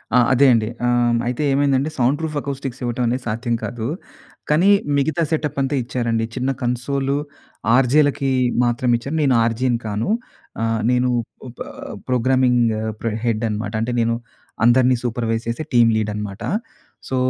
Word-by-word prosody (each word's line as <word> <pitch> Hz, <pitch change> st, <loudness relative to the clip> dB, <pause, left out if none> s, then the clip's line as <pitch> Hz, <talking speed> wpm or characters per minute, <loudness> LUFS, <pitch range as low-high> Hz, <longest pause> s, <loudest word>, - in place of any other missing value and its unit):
ఆ! -, -, +7 dB, 0.2 s
అదే 135 Hz, +2 st, +5 dB
అండి. 110 Hz, -1 st, +1 dB, 0.2 s
ఆ! -, -, +2 dB, 0.4 s
అయితే 125 Hz, +4 st, -1 dB
ఏమైందంటే 140 Hz, +1 st, +2 dB
సౌండ్ 130 Hz, +4 st, +2 dB
ప్రూఫ్ 160 Hz, -2 st, -3 dB
అకౌ‌‌‌స్టిక్స్ 135 Hz, -2 st, -5 dB
ఇవ్వటం 120 Hz, +1 st, -1 dB
అనేది 125 Hz, +2 st, -1 dB
సాధ్యం 115 Hz, +2 st, -1 dB
కాదు. 115 Hz, -2 st, -4 dB, 0.6 s
కానీ 170 Hz, +7 st, +4 dB, 0.3 s
మిగతా 160 Hz, +4 st, +1 dB
సెటప్ 150 Hz, -3 st, -1 dB
అంతా 135 Hz, +1 st, 0 dB
ఇచ్చారండి, 115 Hz, -2 st, -1 dB
చిన్న 130 Hz, +1 st, -1 dB
కన్సోల్ 135 Hz, +3 st, -1 dB, 0.6 s
ఆర్జే‌‌లకి 140 Hz, +1 st, +3 dB, 0.3 s
మాత్రం 120 Hz, +1 st, 0 dB
ఇచ్చారు. 140 Hz, +6 st, -5 dB
నేను 130 Hz, -3 st, +3 dB
ఆర్జే‌‌ని 120 Hz, +1 st, 0 dB
కాను. 105 Hz, -, -2 dB, 0.5 s
ఆహ్, 115 Hz, -1 st, 0 dB
నేను 125 Hz, 0 st, +2 dB, 0.4 s
ఓప 120 Hz, -, -12 dB, 0.5 s
ప్రోగ్రామింగ్ 125 Hz, 0 st, +3 dB, 0.4 s
ప్ర 115 Hz, -, -1 dB, 0.2 s
హెడ్ 115 Hz, -1 st, 0 dB
అనమాట. 105 Hz, 0 st, -3 dB
అంటే 120 Hz, +2 st, -1 dB
నేను 115 Hz, 0 st, +1 dB, 0.5 s
అందరిని 125 Hz, +1 st, +5 dB
సూపర్వైస్ 115 Hz, -1 st, -1 dB
చేసే 120 Hz, +7 st, -2 dB
టీమ్ 115 Hz, -1 st, +5 dB
లీడ్ 110 Hz, -1 st, 0 dB
అనమాట. 105 Hz, 0 st, -6 dB, 0.7 s
సో 130 Hz, -, -1 dB
125 Hz, 145 wpm, -20 LUFS, 115-135 Hz, 0.7 s, ఆ